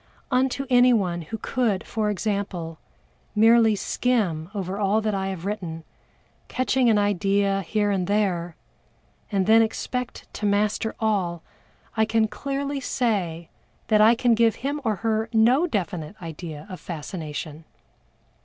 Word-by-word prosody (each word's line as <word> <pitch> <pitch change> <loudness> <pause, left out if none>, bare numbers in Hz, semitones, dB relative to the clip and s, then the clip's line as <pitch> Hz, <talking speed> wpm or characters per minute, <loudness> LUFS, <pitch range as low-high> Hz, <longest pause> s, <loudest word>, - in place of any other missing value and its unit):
Unto 265 +2 +1
anyone 235 -9 +3
who 170 +8 -6
could, 220 -5 -1
for 215 -2 -1
example, 200 -6 -3 0.6
merely 225 0 +5
skim 195 -8 0
over 195 0 -3
all 205 +1 +2
that 215 -1 -1
I 195 -1 -1
have 190 -2 -5
written, 175 -6 -4 0.6
catching 255 -1 +1
an 220 - +4
idea 200 0 +1
here 205 +3 0
and 185 -3 -1
there, 185 -5 0 0.8
and 195 -2 +1
then 220 +2 +6
expect 250 +2 -3
to 210 - -2
master 210 +2 0
all, 190 -7 0 0.5
I 220 0 +3
can 220 0 +2
clearly 275 +3 -3
say 190 -11 -1 0.4
that 215 -1 +5
I 225 +2 +7
can 240 0 +3
give 225 -1 +3
him 290 +1 -1
or 220 -3 +1
her 220 0 +1
no 245 +9 +4
definite 195 - -3
idea 160 -3 -7
of 185 -3 -8
fascination. 155 -2 -6
210 Hz, 135 wpm, -24 LUFS, 180-225 Hz, 0.8 s, I